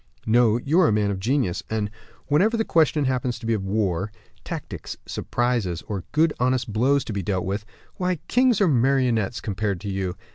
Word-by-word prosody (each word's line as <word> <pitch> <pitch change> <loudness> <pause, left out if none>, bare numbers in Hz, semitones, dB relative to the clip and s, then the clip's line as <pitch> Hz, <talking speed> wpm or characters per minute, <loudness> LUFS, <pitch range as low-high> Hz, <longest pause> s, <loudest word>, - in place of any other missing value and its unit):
"No; 115 0 +4
you 145 +8 +1
are 180 - +6
a - - +3
man 105 -1 +1
of 95 - -3
genius; 115 -3 0
and 105 -2 -1 0.3
whenever 190 - +3
the 225 - 0
question 155 -3 +3
happens 125 -2 -1
to 115 - -10
be 115 - +1
of 105 -3 -1
war, 95 -1 -1 0.3
tactics, - - -6
surprises, 120 -9 -1
or 100 -4 -4
good 155 0 +3
honest 125 -3 0
blows 135 +6 +3
to 110 - -4
be 100 - -2
dealt 95 -1 -1
with, 100 +3 -3 0.3
why, 180 0 0
kings 250 -3 +3
are 195 - +5
marionettes, 125 - +2
compared 100 -2 -2
to 100 - -5
you. 95 -2 -2
115 Hz, 190 wpm, -24 LUFS, 100-140 Hz, 0.3 s, are